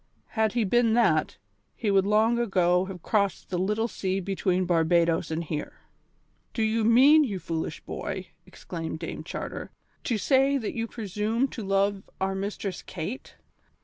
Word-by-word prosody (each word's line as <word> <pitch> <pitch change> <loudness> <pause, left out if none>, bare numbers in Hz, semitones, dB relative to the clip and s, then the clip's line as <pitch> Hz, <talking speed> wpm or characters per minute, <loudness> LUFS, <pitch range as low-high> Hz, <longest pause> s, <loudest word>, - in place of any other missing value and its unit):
Had 220 -2 +1
he 235 -1 +1
been 230 +2 +3
that, 165 -10 +2 0.4
he 215 -3 -1
would 195 0 +3
long 220 +3 +3
ago 185 -5 +2
have 190 -3 -8
crossed 200 -4 0
the 180 - 0
little 210 +5 0
sea 190 -4 -2
between 185 -1 0
Barbadoes 170 -1 +2
and 160 +1 -2
here." 150 -2 -4 0.8
"Do 225 - +1
you 220 +1 +1
mean, 265 +8 +7
you 210 -9 -2
foolish 165 -3 -4
boy," - - -5
exclaimed 165 -2 -6
Dame - - -6
Charter, - - -6 0.4
"to 235 - +1
say 270 +5 +3
that 225 -5 -3
you 230 -1 -2
presume 220 +3 -1
to 235 - -7
love 195 0 +1 0.2
our 190 0 0
Mistress 195 -1 -4
Kate?" 210 +11 -6
200 Hz, 155 wpm, -27 LUFS, 180-230 Hz, 0.8 s, mean